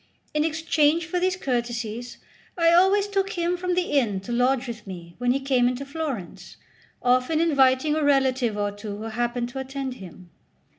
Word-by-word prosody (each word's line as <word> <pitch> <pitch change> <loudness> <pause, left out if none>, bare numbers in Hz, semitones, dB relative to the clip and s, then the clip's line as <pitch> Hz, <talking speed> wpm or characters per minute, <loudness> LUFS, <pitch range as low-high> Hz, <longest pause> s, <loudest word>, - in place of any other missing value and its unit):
In 300 0 +2
exchange 320 0 +2
for 355 +3 -2
these 370 +1 +1
courtesies 240 -5 -3 0.4
I 335 -1 +4
always 385 +3 +4
took 395 0 -1
him 345 -1 0
from 360 0 -2
the 360 0 0
inn 230 -9 +1
to 215 - -7
lodge 250 +1 +1
with 230 -3 -7
me 170 -2 -9
when 245 0 +2
he 270 - +1
came 265 -3 +2
into 250 +2 -2
Florence, 275 - -6 0.5
often 255 +5 +2
inviting 275 -2 +3
a 310 - 0
relative 260 -5 +2
or 205 0 -1
two 205 0 -7
who 215 - -7
happened 240 +2 -2
to 265 - -6
attend 265 0 -4
him. 180 -1 -12
265 Hz, 180 wpm, -25 LUFS, 235-320 Hz, 0.5 s, I